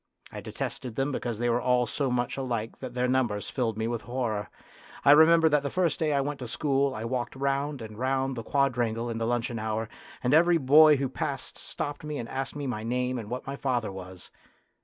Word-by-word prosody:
I -, -, -7 dB
detested 120 Hz, -4 st, -5 dB
them 135 Hz, +4 st, 0 dB
because 120 Hz, -4 st, -3 dB
they 120 Hz, +2 st, 0 dB
were 120 Hz, +1 st, +2 dB
all 125 Hz, 0 st, +3 dB
so 140 Hz, +2 st, -1 dB
much 120 Hz, -1 st, -1 dB
alike 120 Hz, -4 st, -3 dB
that 125 Hz, -2 st, -7 dB
their 125 Hz, 0 st, +1 dB
numbers 120 Hz, -6 st, 0 dB
filled 115 Hz, -5 st, -1 dB
me 110 Hz, 0 st, -1 dB
with 120 Hz, -1 st, -2 dB
horror. 115 Hz, -4 st, -3 dB, 0.6 s
I 140 Hz, -, +8 dB
remember 160 Hz, +2 st, +7 dB
that 150 Hz, -1 st, +3 dB
the 140 Hz, -, -3 dB
first 175 Hz, -2 st, 0 dB
day 155 Hz, -2 st, +1 dB
I 140 Hz, -1 st, +2 dB
went 145 Hz, +1 st, -3 dB
to 125 Hz, -, -5 dB
school 140 Hz, +1 st, 0 dB
I 110 Hz, -, -4 dB
walked 120 Hz, +1 st, -3 dB
round 140 Hz, 0 st, -1 dB
and 110 Hz, 0 st, -9 dB
round 135 Hz, +1 st, 0 dB
the 115 Hz, -, -4 dB
quadrangle 120 Hz, -3 st, 0 dB
in 115 Hz, -, -4 dB
the 115 Hz, -, -1 dB
luncheon 120 Hz, -1 st, -1 dB
hour, 110 Hz, 0 st, -2 dB, 0.3 s
and 125 Hz, +2 st, +2 dB
every 170 Hz, +2 st, +5 dB
boy 150 Hz, +2 st, +7 dB
who 135 Hz, -1 st, -1 dB
passed 130 Hz, -, -4 dB
stopped 145 Hz, 0 st, -4 dB
me 150 Hz, -1 st, -4 dB
and 115 Hz, -, -5 dB
asked 135 Hz, +1 st, -4 dB
me 145 Hz, -1 st, -4 dB
my 120 Hz, -5 st, -3 dB
name 125 Hz, +2 st, -1 dB
and 105 Hz, -2 st, -8 dB
what 125 Hz, +1 st, -4 dB
my 135 Hz, -, -4 dB
father 125 Hz, -6 st, -1 dB
was. 95 Hz, -1 st, -10 dB
125 Hz, 220 wpm, -28 LUFS, 115-140 Hz, 0.6 s, I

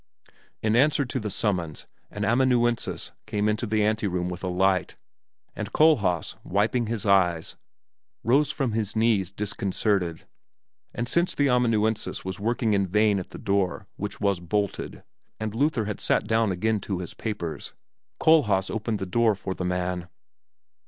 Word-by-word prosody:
In 110 Hz, 0 st, +2 dB
answer 140 Hz, +2 st, +3 dB
to 130 Hz, +1 st, -3 dB
the 105 Hz, -2 st, -3 dB
summons 90 Hz, -7 st, -2 dB, 0.2 s
an 105 Hz, 0 st, -3 dB
amanuensis 120 Hz, 0 st, +1 dB, 0.2 s
came 105 Hz, 0 st, 0 dB
into 110 Hz, +3 st, 0 dB
the 110 Hz, 0 st, +1 dB
anteroom 100 Hz, -5 st, 0 dB
with 90 Hz, +1 st, -6 dB
a -, -, -1 dB
light, 90 Hz, 0 st, +1 dB, 0.6 s
and -, -, -5 dB
Kohlhaas, 105 Hz, -, +3 dB
wiping 110 Hz, +5 st, +1 dB
his 110 Hz, -2 st, -3 dB
eyes, 90 Hz, -5 st, +2 dB, 0.7 s
rose 140 Hz, +5 st, +3 dB
from 140 Hz, -5 st, -1 dB
his 110 Hz, -1 st, -2 dB
knees 110 Hz, -5 st, +2 dB
disconcerted; 100 Hz, -3 st, -1 dB, 0.7 s
and 120 Hz, -, -3 dB
since 170 Hz, +7 st, +1 dB
the 145 Hz, -1 st, +2 dB
amanuensis 115 Hz, -5 st, +1 dB
was 95 Hz, 0 st, -4 dB
working 115 Hz, +1 st, 0 dB
in 100 Hz, -1 st, +2 dB
vain 105 Hz, +1 st, +3 dB
at 90 Hz, -, -7 dB
the -, -, -9 dB
door, 100 Hz, -1 st, 0 dB
which 105 Hz, +1 st, -5 dB
was 100 Hz, -3 st, +1 dB
bolted, 100 Hz, +3 st, -3 dB, 0.4 s
and 110 Hz, -1 st, -3 dB
Luther 125 Hz, -2 st, +1 dB
had 105 Hz, -1 st, -4 dB
sat -, -, +2 dB
down 110 Hz, -2 st, +2 dB
again 110 Hz, +4 st, 0 dB
to 95 Hz, -1 st, -3 dB
his 90 Hz, -1 st, -6 dB
papers, 105 Hz, -8 st, -5 dB, 0.4 s
Kohlhaas 105 Hz, -12 st, +4 dB
opened 110 Hz, 0 st, -2 dB
the 95 Hz, -, -4 dB
door 110 Hz, +3 st, +2 dB
for 95 Hz, 0 st, -4 dB
the 90 Hz, -, -4 dB
man. 90 Hz, 0 st, -2 dB
105 Hz, 155 wpm, -26 LUFS, 95-115 Hz, 0.7 s, Kohlhaas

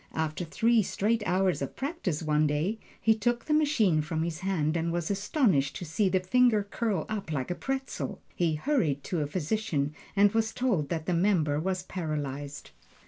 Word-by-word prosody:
After 160 Hz, +2 st, -1 dB
three 225 Hz, +7 st, +3 dB
straight 215 Hz, +3 st, 0 dB
hours 185 Hz, -2 st, +2 dB
of 140 Hz, -, -4 dB
practise 265 Hz, -, -3 dB
one 150 Hz, 0 st, +2 dB
day, 160 Hz, +10 st, -1 dB, 0.2 s
he 225 Hz, -, +4 dB
took 240 Hz, +2 st, -1 dB
the 305 Hz, -, 0 dB
machine 245 Hz, -, +3 dB
from 160 Hz, +1 st, -2 dB
his 165 Hz, -1 st, -3 dB
hand 170 Hz, -5 st, 0 dB
and 165 Hz, 0 st, 0 dB
was 170 Hz, +1 st, -1 dB
astonished 195 Hz, -, +1 dB
to 180 Hz, -, -5 dB
see 190 Hz, +5 st, +1 dB
the 185 Hz, -, +2 dB
finger 225 Hz, +2 st, +3 dB
curl 200 Hz, -4 st, -2 dB
up 205 Hz, -6 st, -4 dB
like 140 Hz, 0 st, -2 dB
a -, -, +2 dB
pretzel. 270 Hz, +7 st, -4 dB
He 165 Hz, -3 st, +1 dB
hurried 155 Hz, -, 0 dB
to 175 Hz, -, -2 dB
a 145 Hz, -, -1 dB
physician 155 Hz, -3 st, -1 dB, 0.2 s
and 200 Hz, 0 st, +5 dB
was 225 Hz, 0 st, 0 dB
told 200 Hz, -, 0 dB
that 160 Hz, -2 st, -2 dB
the 180 Hz, -, 0 dB
member 165 Hz, -5 st, +2 dB
was 185 Hz, +2 st, -1 dB
paralyzed. 145 Hz, -6 st, -4 dB
180 Hz, 185 wpm, -29 LUFS, 155-220 Hz, 0.2 s, and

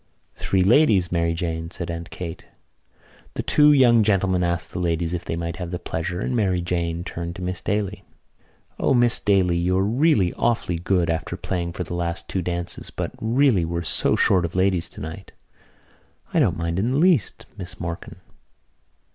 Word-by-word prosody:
"Three 95 Hz, -1 st, 0 dB
ladies, 105 Hz, -, +4 dB
Mary 85 Hz, -1 st, +1 dB
Jane," 80 Hz, -1 st, -3 dB
said 85 Hz, -1 st, -5 dB
Aunt 85 Hz, 0 st, -6 dB
Kate. 85 Hz, -3 st, -7 dB, 0.9 s
The -, -, -2 dB
two 150 Hz, 0 st, +5 dB
young 125 Hz, -5 st, +6 dB
gentlemen 95 Hz, -3 st, +2 dB
asked 85 Hz, -1 st, -1 dB
the -, -, -4 dB
ladies 85 Hz, -1 st, -1 dB
if 90 Hz, -1 st, -3 dB
they -, -, -3 dB
might 85 Hz, 0 st, -4 dB
have 90 Hz, -2 st, -5 dB
the 90 Hz, -, -3 dB
pleasure, 85 Hz, +1 st, -4 dB
and 125 Hz, -, -2 dB
Mary 95 Hz, -6 st, +1 dB
Jane 85 Hz, -1 st, -2 dB
turned 85 Hz, 0 st, -6 dB
to 90 Hz, -, -7 dB
Miss 90 Hz, -1 st, -3 dB
Daly. 105 Hz, -1 st, -2 dB, 0.8 s
"O, -, -, +2 dB
Miss 120 Hz, -1 st, +4 dB
Daly, 95 Hz, -4 st, +2 dB
you're 90 Hz, +2 st, +1 dB
really 115 Hz, -, +2 dB
awfully 110 Hz, -7 st, 0 dB
good, 90 Hz, -1 st, +1 dB
after 85 Hz, +2 st, -3 dB
playing 85 Hz, -3 st, -3 dB
for 90 Hz, -, -3 dB
the 85 Hz, -, -7 dB
last 85 Hz, +1 st, -3 dB
two 95 Hz, -, -2 dB
dances, 85 Hz, 0 st, -4 dB
but -, -, -4 dB
really 115 Hz, -4 st, +3 dB
we're 85 Hz, +1 st, -2 dB
so -, -, +2 dB
short 90 Hz, -3 st, +3 dB
of 85 Hz, 0 st, -4 dB
ladies 95 Hz, -2 st, +1 dB
tonight." 80 Hz, +5 st, -9 dB, 1.0 s
"I -, -, +3 dB
don't -, -, +2 dB
mind 85 Hz, +2 st, -2 dB
in 110 Hz, +5 st, +1 dB
the -, -, +1 dB
least, 165 Hz, -, +2 dB
Miss 90 Hz, -4 st, -7 dB
Morkan." 85 Hz, 0 st, -6 dB
90 Hz, 180 wpm, -23 LUFS, 85-100 Hz, 1.0 s, young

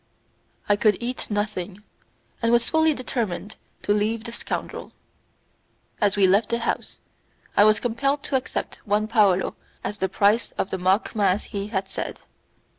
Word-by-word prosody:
I 205 Hz, -, +5 dB
could 210 Hz, 0 st, +3 dB
eat 245 Hz, +1 st, -4 dB
nothing, 205 Hz, -2 st, -3 dB, 0.6 s
and 230 Hz, 0 st, +2 dB
was 235 Hz, 0 st, +3 dB
fully 320 Hz, 0 st, +4 dB
determined 225 Hz, -6 st, -3 dB, 0.3 s
to 205 Hz, -, +2 dB
leave 215 Hz, +2 st, 0 dB
the 235 Hz, -, -6 dB
scoundrel. 235 Hz, -, -5 dB, 1.1 s
As 205 Hz, -1 st, +3 dB
we 200 Hz, -, +5 dB
left 200 Hz, +3 st, +3 dB
the 235 Hz, -, +1 dB
house 235 Hz, -, -3 dB, 0.5 s
I 205 Hz, -, +7 dB
was 215 Hz, 0 st, +5 dB
compelled 275 Hz, +4 st, 0 dB
to -, -, -2 dB
accept 260 Hz, -, -2 dB
one 210 Hz, 0 st, +1 dB
paolo 205 Hz, -5 st, +3 dB, 0.3 s
as 205 Hz, -, -4 dB
the 190 Hz, -, 0 dB
price 205 Hz, +4 st, +2 dB
of -, -, -1 dB
the 190 Hz, -, -2 dB
mock 190 Hz, +5 st, +1 dB
mass 200 Hz, -2 st, +2 dB
he 200 Hz, -2 st, -4 dB
had 195 Hz, -3 st, -2 dB
said. 195 Hz, -, -5 dB
210 Hz, 160 wpm, -24 LUFS, 200-235 Hz, 1.1 s, I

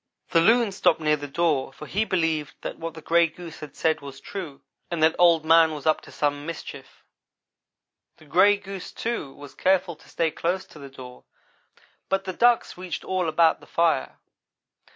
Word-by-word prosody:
The 165 Hz, -, +4 dB
loon 225 Hz, +3 st, +4 dB
stopped 180 Hz, -4 st, +2 dB
near 150 Hz, -1 st, +2 dB
the 145 Hz, -1 st, -7 dB
door, 145 Hz, -3 st, 0 dB
for 150 Hz, -, -11 dB
he 210 Hz, +7 st, -1 dB
believed 160 Hz, -6 st, -1 dB
that -, -, -6 dB
what 165 Hz, 0 st, -6 dB
the 160 Hz, -, -10 dB
gray 170 Hz, 0 st, +4 dB
goose 165 Hz, 0 st, -11 dB
had 145 Hz, -2 st, -10 dB
said 160 Hz, -2 st, 0 dB
was 140 Hz, -1 st, -10 dB
true, 175 Hz, -9 st, -8 dB, 0.3 s
and 170 Hz, -2 st, -1 dB
that 160 Hz, 0 st, +4 dB
Old 170 Hz, -3 st, +5 dB
man 165 Hz, -1 st, +5 dB
was 145 Hz, -, -9 dB
up 155 Hz, -, +2 dB
to -, -, -14 dB
some 145 Hz, -1 st, -1 dB
mischief. 145 Hz, -4 st, -9 dB, 1.1 s
The 155 Hz, -, -18 dB
gray 195 Hz, +7 st, +4 dB
goose, 195 Hz, -2 st, -8 dB
too, 230 Hz, -12 st, -4 dB
was 145 Hz, 0 st, -12 dB
careful 185 Hz, -2 st, +1 dB
to -, -, -20 dB
stay 165 Hz, -2 st, 0 dB
close 180 Hz, +5 st, -2 dB
to 150 Hz, -, -15 dB
the 140 Hz, -1 st, -10 dB
door 125 Hz, -2 st, -12 dB, 0.8 s
but 195 Hz, 0 st, 0 dB
the 185 Hz, -, -5 dB
ducks 240 Hz, -3 st, +2 dB
reached 180 Hz, -3 st, -5 dB
all 185 Hz, -3 st, -1 dB
about 160 Hz, +1 st, +3 dB
the -, -, -17 dB
fire. 165 Hz, -5 st, 0 dB
165 Hz, 190 wpm, -25 LUFS, 150-185 Hz, 1.1 s, Old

